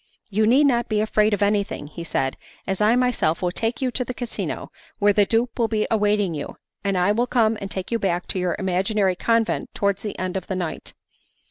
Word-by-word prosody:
'You 215 +2 +2
need 260 +6 +5
not 240 -4 +2
be 215 -1 +1
afraid 215 0 +2
of 205 -1 +1
anything,' 200 -7 -1
said 135 -5 -1 0.3
he, - - -2
'as 190 - -2
I 215 +3 +5
myself 245 -10 +1
will 175 - +1
take 225 +7 -2
you 255 - +1
to 250 - -1
the 250 0 -6
casino 245 -1 -4 0.3
where 205 0 +4
the 205 -1 +3
dupe 235 +2 0
will 230 - +3
be 215 -1 0
awaiting 205 -4 +2
you, 145 -2 -6 0.3
and 195 -2 0
I 180 +3 +3
will 235 +4 +1
come 225 -3 +2
and 195 - -4
take 190 +1 -5
you 230 - +1
back 180 -3 0
to 190 - -1
your 180 -1 0
imaginary 190 +1 +1
convent 230 +3 0
towards 200 -1 0
the 210 - -5
end 185 0 -3
of 190 - -6
the 190 - -2
night. 175 -3 -5
205 Hz, 225 wpm, -23 LUFS, 190-230 Hz, 0.3 s, need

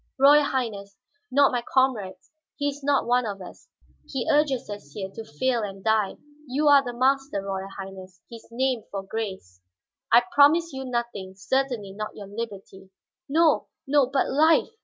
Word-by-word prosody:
"Royal 285 +2 +6
Highness, 205 -7 -3 0.3
not 280 +2 +4
my 245 -1 -1
comrades. 225 -8 -1
But 310 0 -58
he 285 0 0
is 285 0 -8
not 280 0 +2 0.2
of 205 -3 -5
us; 180 - -12 0.4
he 265 -3 -4
urges 290 -4 +2
us 205 -9 -9
here 190 0 -5
to 225 - -8
fail 235 - -1
and 195 -2 -6
die. 220 -3 +1 0.3
You 290 +4 +2
are 280 -1 +7
the 245 - -4
master; 270 -1 +1
Royal 195 -1 -4
Highness, 190 -2 -9
his 230 -1 -12
name 255 0 0
for 195 -1 -5
grace." 190 - -6 0.5
"I 235 +1 +7
promise 305 +3 +5
you 265 0 -5
nothing. 235 -6 -4
Certainly 240 0 -1
not 215 +1 -6
your 205 - -8
liberty." 195 -2 -8 0.4
"No, 320 +1 +3 0.2
no, 275 -1 +3
but 270 +1 0
life!" 315 +4 +3
235 Hz, 165 wpm, -25 LUFS, 195-275 Hz, 0.5 s, are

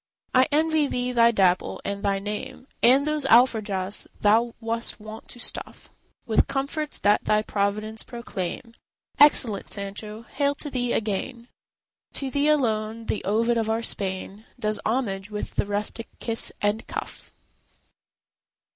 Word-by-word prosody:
I 255 0 +5
envy 310 0 +2
thee 250 -1 -1
thy 235 -1 +5
Dapple, 190 -5 +2
and 200 0 -3
thy 200 -1 +1
name, 210 +7 -6 0.2
And 265 +4 +5
those 305 -1 +1
alforjas 215 -6 +3
thou 225 +3 +3
wast 230 0 -3
wont 215 +1 -10
to - - -10
stuff - - -6 0.3
With - - +2
comforts 290 +3 -2
that 205 +1 +3
thy 215 0 +2
providence 215 +2 -1
proclaim. 230 -1 -6 0.5
Excellent 250 -8 +5
Sancho! 210 +2 -5
hail 285 +3 -1
to 290 0 -5
thee 245 -2 -1
again! 230 +3 -2 0.6
To 270 -2 -3
thee 285 +1 +2
alone 225 -6 +1
the 215 - -2
Ovid 230 +4 +2
of 220 -1 -1
our 225 +1 0
Spain 195 +1 -3
Does 215 -1 -1
homage 210 -5 -1
with 210 -1 -5
the - - -1
rustic 210 +2 -2
kiss 230 -1 +1
and 205 +2 0
cuff. - - -7
225 Hz, 140 wpm, -25 LUFS, 205-255 Hz, 0.6 s, I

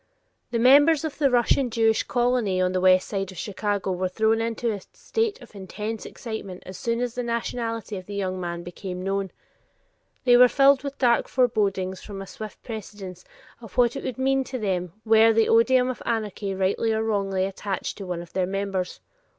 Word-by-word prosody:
The 240 - -1
members 285 +6 +5
of 310 - -5
the 280 -2 +4
Russian 245 +1 +2
Jewish 225 -1 +2
colony 240 -6 +1
on 180 0 +2
the 185 0 0
west 185 0 +5
side 195 -2 -3
of 185 - -13
Chicago 200 0 -2
were 185 0 -1
thrown 220 +4 +1
into 230 0 -1
a 205 -2 -5
state 450 -2 -2
of 235 - -16
intense 210 +3 -6
excitement 220 -6 -7
as 185 - -8
soon 230 +3 -2
as 245 -2 -2
the 245 - -3
nationality 230 -2 -3
of 185 - -9
the 205 - -6
young 185 -2 -2
man 170 -1 -4
became 180 +1 -7
known. 195 0 -1 0.9
They 245 -2 +6
were 250 0 +8
filled 275 +1 +4
with 280 0 -6
dark 240 -2 +3
forebodings 200 -7 0
from 200 -2 -8
a 195 - -6
swift 215 +2 -9
prescience 205 -5 -8 0.4
of 225 -5 -13
what 240 -1 +4
it - - -5
would 255 - -4
mean 270 0 +2
to 255 - -5
them 180 -6 -2
were 225 0 +6
the 225 0 +3
oduim 250 +2 +4
of 255 - -9
anarchy 210 -3 -2
rightly 195 +4 +1
or 220 0 0
wrongly 195 -3 0
attached 195 +1 -4
to 195 - -6
one 175 -1 -3
of 170 - -17
their 185 -1 0
members. 195 -1 -3
215 Hz, 195 wpm, -25 LUFS, 190-240 Hz, 0.9 s, were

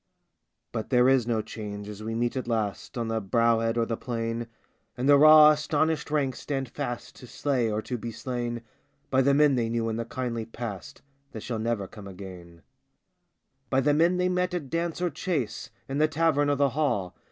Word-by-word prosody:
But 110 - -4
there 125 -1 +4
is 130 -3 +3
no 110 -2 0
change 105 -2 -7
as 105 0 -8
we 110 +1 -4
meet 120 +2 0
at 130 -2 -3
last 110 -1 -2
On 115 -1 -2
the 115 0 -1
brow 115 +3 +2
head 115 +1 0
or 115 - +2
the 115 - -2
plain, 115 -1 -3 0.5
And 125 +2 -1
the 145 - +8
raw 155 +1 +9
astonished 155 +1 0
ranks 140 -4 0
stand 135 -3 -3
fast 120 0 -5
To 125 - -12
slay 125 -4 0
or 105 +1 -2
to 125 -2 -4
be 115 +1 -5
slain 120 0 -4 0.5
By 130 0 +4
the 140 +1 +3
men 150 -1 +5
they 120 -3 0
knew 115 -1 -1
in 110 - -2
the 115 - -3
kindly 115 -2 -4
past 115 -6 -7 0.3
That 110 - -7
shall 115 -3 -3
never 110 -3 -1
come 100 +1 -11
again 90 -3 -11 0.5
— 135 0 -48
By 135 - +2
the 145 +2 +3
men 170 +4 +3
they 180 0 +2
met 180 0 0
at 150 -7 -5
dance 170 +1 -2
or 175 - +1
chase, 145 - -3 0.2
In 135 +2 -2
the 155 - +5
tavern 155 -2 +2
or 145 - +3
the 140 0 +3
hall. 125 - -1
120 Hz, 210 wpm, -27 LUFS, 115-145 Hz, 0.5 s, raw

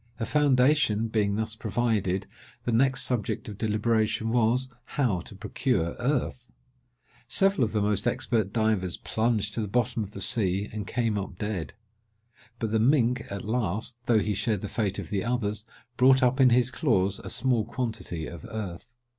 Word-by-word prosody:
A 115 - -1
foundation 130 -6 +3
being 105 -2 +1
thus 110 0 -2
provided, 105 -4 0 0.4
the 120 - -1
next 130 +3 +3
subject 120 -6 -1
of 105 -2 -8
deliberation 110 0 +1
was, 120 +2 +2 0.3
how 120 -11 +2
to 100 - -9
procure 95 - -1
earth. 125 -1 -1 0.8
Several 195 -8 +2
of 110 - 0
the 105 -2 0
most 105 +2 +1
expert 110 -4 0
divers 110 -5 0
plunged 110 -2 -1
to 115 - -2
the 105 - -2
bottom 115 +1 0
of 100 0 -9
the - - -7
sea, 100 -1 +1
and 105 -2 -5
came 115 -4 0
up 95 -2 -6
dead; 100 -8 -3 0.8
but 110 -2 -3
the 110 - +2
mink, 125 -1 +3
at 100 0 -5
last, 110 0 -2
though 115 - +4
he 105 0 +1
shared 105 0 -1
the 105 - -4
fate 100 -2 -1
of - - -6
the 100 -2 0
others, 110 -3 -2 0.3
brought 130 +1 +5
up 125 +2 +3
in 130 - +7
his 125 +1 +3
claws 100 - +1
a - - -8
small 125 -3 +1
quantity 110 -8 -4
of 85 -3 -9
earth. 100 -3 -6
110 Hz, 170 wpm, -27 LUFS, 100-125 Hz, 0.8 s, in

